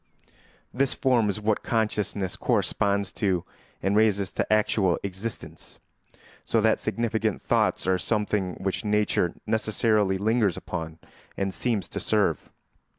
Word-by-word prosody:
This 135 +1 +1
form 120 -5 +2
is 100 - -2
what 105 0 0
consciousness 105 -4 -1
corresponds 100 -1 0
to 95 -5 0 0.4
and 95 +1 +1
raises 100 -3 +2
to - - -2
actual 105 -4 +3
existence; 100 +3 -6 0.7
so - - +1
that - - +3
significant 110 -2 -1
thoughts - - +1
are 95 0 +2
something 105 -3 -1
which 95 +3 -3
nature 105 -4 +1
necessarily 110 -2 +1
lingers 105 -2 +1
upon 80 -3 -5 0.4
and 95 -1 -1
seems 115 -4 -1
to - - -4
serve. - - 0
105 Hz, 125 wpm, -26 LUFS, 95-110 Hz, 0.7 s, actual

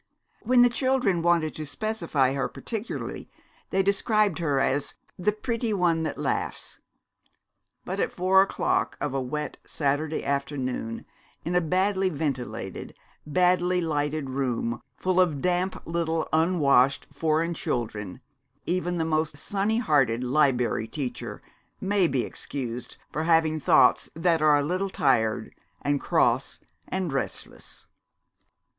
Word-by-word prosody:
When 245 +1 +5
the 245 - +6
children 250 -8 +1
wanted 170 -2 +2
to 155 - -4
specify 165 -8 0
her 135 -1 -1
particularly 225 -1 -5 0.4
they 195 0 +2
described 200 -1 +2
her 145 -5 +1
as 135 +1 0 0.2
"the 200 +4 +2
pretty 230 +1 -2
one 175 -4 +2
that 160 - -3
laughs." - - -3 1.1
But - - -3
at - - 0
four 185 +1 +4
o'clock 195 - 0
of - - -2
a 135 - 0
wet 150 +4 -4
Saturday 150 +2 -1
afternoon, 135 -5 -2 0.4
in 170 - -1
a 180 - +3
badly 190 +3 +1
ventilated, 125 - -4 0.3
badly 180 +3 +3
lighted 150 -3 -1
room 120 -3 -1 0.2
full 185 0 +1
of 165 -6 +3
damp 180 +3 0
little 165 -1 -1
unwashed 145 -5 +3
foreign 160 +3 +1
children, 110 - -3 0.4
even 175 0 -1
the 165 - 0
most 155 -2 0
sunny 205 +7 0
hearted 135 - +2
Liberry 125 -4 +2
Teacher 135 -2 -5 0.4
may 195 -2 +2
be 130 -5 0
excused 125 -3 -6
for 155 +2 -2
having 160 -1 +3
thoughts - - +4
that 165 -1 +2
are 150 -1 +5
a 145 - +1
little 185 +6 -1
tired 115 -10 +1 0.3
and 145 -1 +1
cross - - +1 0.3
and 185 -5 -2
restless. 135 - -4
160 Hz, 130 wpm, -26 LUFS, 140-185 Hz, 1.1 s, the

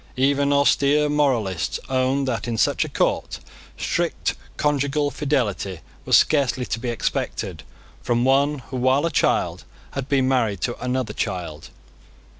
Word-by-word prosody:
Even 140 +2 +2
austere 140 +1 +3
moralists 120 - 0
owned 130 +1 +1
that, 120 -1 -2
in 115 -1 -2
such - - +2
a - - -6
court, - - -1 0.4
strict - - -1 0.2
conjugal 145 0 +1
fidelity 125 - -1 0.2
was - - +6
scarcely 135 -4 +2
to 115 - -3
be 120 +1 -3
expected 120 - -3 0.4
from 120 0 +1
one 140 +3 +3 0.2
who, - - -1
while 130 +4 +2
a 170 - 0
child, - - +1 0.3
had 135 0 -5
been 135 -2 +2
married 115 -7 +1
to 120 - -1
another 125 -3 -1
child. 90 -8 -4
130 Hz, 140 wpm, -23 LUFS, 120-140 Hz, 0.4 s, was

